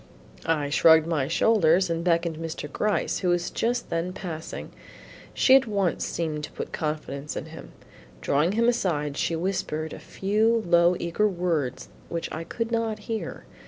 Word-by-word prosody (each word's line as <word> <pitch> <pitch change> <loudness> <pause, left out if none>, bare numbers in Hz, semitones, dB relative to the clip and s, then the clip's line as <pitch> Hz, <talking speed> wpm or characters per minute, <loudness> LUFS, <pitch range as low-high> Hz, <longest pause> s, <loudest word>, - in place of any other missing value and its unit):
I 150 -3 0
shrugged 160 +1 +6
my 155 -5 0
shoulders 185 0 +3
and 165 0 -2
beckoned 170 -1 +1
to 160 - -9
Mr. 160 -2 -5
Gryce 210 0 0
who 185 - 0
was 175 0 0
just 240 +1 -1
then 170 +2 -1
passing. 165 -4 -6 0.6
She 260 - +6
at 270 -2 +4
once 200 -5 0
seemed 155 -3 -3
to - - -14
put - - -6
confidence 150 -2 -4
in - - -4
him. 160 0 -11 0.5
Drawing 150 +7 +1
him 230 +2 +2
aside, 155 -11 0
she 165 - 0
whispered 160 -3 -2
a - - -8
few 220 +3 +1
low 170 +1 +4
eager 170 +5 +1
words 170 -8 -2 0.2
which 170 -1 -4
I 160 - -4
could 230 +7 -4
not 225 -2 0
hear. 220 - -4
170 Hz, 165 wpm, -26 LUFS, 160-205 Hz, 0.6 s, shrugged